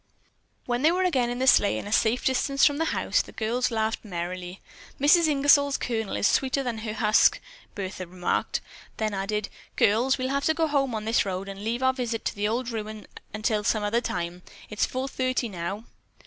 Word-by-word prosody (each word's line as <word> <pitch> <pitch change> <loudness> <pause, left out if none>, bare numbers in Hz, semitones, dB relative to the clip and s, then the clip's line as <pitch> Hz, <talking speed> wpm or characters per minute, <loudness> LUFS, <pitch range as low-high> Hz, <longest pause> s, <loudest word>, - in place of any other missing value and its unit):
When 245 0 -1
they 310 +3 +5
were 365 +2 +1
again 260 -10 +1
in 245 - -3
the 260 - 0
sleigh, 205 -5 +5
and - - -6
a - - -6
safe 225 +3 +2
distance 275 +1 +2
from 285 -1 +3
the 325 - 0
house, - - +1
the - - -12
girls 240 +3 -1
laughed 220 -1 -1
merrily. 180 -1 -5 0.4
"Mrs. 315 +4 +5
Ingersol's 285 -1 +4
kernel 225 -4 -3
is - - 0
sweeter 270 +1 +1
than 240 -3 -3
her 215 -1 -4
husk," 215 0 +4 0.4
Bertha 185 -2 -5
remarked. 180 0 -1 0.4
Then 215 -1 -1
added: 200 +2 -2 0.3
"Girls, 235 +6 +3
we'll 260 0 -2
have 280 +1 -1
to 315 - +2
go 325 0 +2
home 275 -5 0
on 215 0 -4
this 225 +1 +2
road 190 0 -4
and 195 0 -8
leave 235 +4 -2
our 260 0 +4
visit 240 -3 -3
to - - -2
the 205 0 0
old 240 +3 -2
ruin 215 -1 -6 0.3
until 215 0 -1
some 215 0 +1
other 220 +3 +1
time. 175 -4 -4 0.3
It's 210 - 0
four 260 +1 -3
thirty 255 -2 -1
now." 190 +2 -5
225 Hz, 205 wpm, -26 LUFS, 205-260 Hz, 0.4 s, they